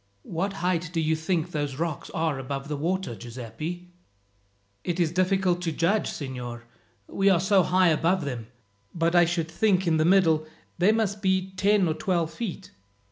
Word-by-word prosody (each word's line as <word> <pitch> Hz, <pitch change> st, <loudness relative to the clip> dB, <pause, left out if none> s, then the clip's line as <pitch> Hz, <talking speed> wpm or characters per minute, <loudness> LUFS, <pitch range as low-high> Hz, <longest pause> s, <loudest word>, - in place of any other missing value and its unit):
"What 190 Hz, +4 st, -2 dB
height 180 Hz, -2 st, 0 dB
do 170 Hz, -, -1 dB
you 160 Hz, 0 st, +1 dB
think 165 Hz, +1 st, -1 dB
those 145 Hz, -4 st, -2 dB
rocks 160 Hz, 0 st, -3 dB
are 160 Hz, -4 st, -1 dB
above 135 Hz, +1 st, -5 dB
the 150 Hz, -, -1 dB
water, 175 Hz, 0 st, -2 dB
Giuseppi?" 125 Hz, +10 st, -7 dB, 0.9 s
"It 175 Hz, 0 st, -2 dB
is 165 Hz, -3 st, +2 dB
difficult 185 Hz, 0 st, +1 dB
to 170 Hz, -2 st, -1 dB
judge, 175 Hz, +7 st, +1 dB
signor, 125 Hz, -4 st, -6 dB, 0.4 s
we 195 Hz, -, +1 dB
are 185 Hz, -3 st, +4 dB
so 190 Hz, +1 st, +4 dB
high 180 Hz, 0 st, +3 dB
above 165 Hz, +2 st, +1 dB
them; 120 Hz, -5 st, -5 dB, 0.5 s
but 165 Hz, 0 st, +1 dB
I 175 Hz, -1 st, +6 dB
should 165 Hz, -1 st, -2 dB
think 190 Hz, +1 st, +2 dB
in 165 Hz, -2 st, +2 dB
the 155 Hz, -, +3 dB
middle 165 Hz, -3 st, +4 dB, 0.3 s
they 185 Hz, +4 st, +5 dB
must 210 Hz, -2 st, 0 dB
be 190 Hz, -1 st, +1 dB
ten 200 Hz, 0 st, +3 dB
or 160 Hz, -, +1 dB
twelve 170 Hz, -1 st, -1 dB
feet." 190 Hz, -1 st, -6 dB
170 Hz, 175 wpm, -26 LUFS, 155-185 Hz, 0.9 s, I